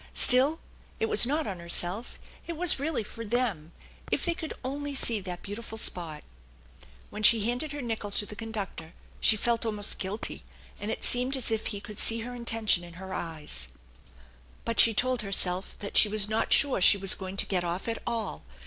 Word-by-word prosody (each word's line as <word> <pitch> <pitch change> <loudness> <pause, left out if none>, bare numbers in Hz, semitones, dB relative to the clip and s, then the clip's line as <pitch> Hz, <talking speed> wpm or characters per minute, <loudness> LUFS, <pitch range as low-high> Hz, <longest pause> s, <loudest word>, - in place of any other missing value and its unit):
Still, 275 +5 +6 0.4
it 450 - +1
was 435 - +5
not 300 +3 0
on 190 -3 -5
herself; 175 +5 -1 0.3
it 335 -2 -5
was 350 -4 +7
really 285 -4 -2
for 230 +2 -9
them. 210 -9 -2 0.4
If - - 0
they 340 - +1
could 330 -2 -7
only 285 +2 -4
see 230 -4 +2
that 180 -2 -7
beautiful 220 +2 -7
spot! 165 -7 +1 0.9
When 210 - -7
she 220 +1 +6
handed 245 +7 -2
her 290 -2 -6
nickel 225 -3 -4
to 205 +1 -2
the 210 - -10
conductor, 205 -7 -6 0.3
she 215 - +4
felt 235 +2 0
almost 210 -2 -3
guilty, 200 +3 -5 0.4
and 205 - -5
it 225 - -4
seemed 250 +2 +1
as 250 -3 -1
if 220 -1 -2
he 205 - -5
could 210 0 -9
see 225 0 +3
her 245 +2 -7
intention 225 -6 +1
in 175 -1 -12
her 190 +2 -8
eyes; 155 - -3 1.0
but 230 - -3
she 225 -2 +6
told 255 +1 +1
herself 190 -2 -2
that 200 - -7
she 210 - +5
was 210 -1 +2
not 220 +1 -1
sure 275 -8 +4
she 200 - +7
was 195 -1 +4
going 190 0 -6
to - - +4
get 180 -3 -1
off 175 +4 -4
at 230 0 -3
all. 220 - -3
220 Hz, 195 wpm, -28 LUFS, 190-245 Hz, 1.0 s, was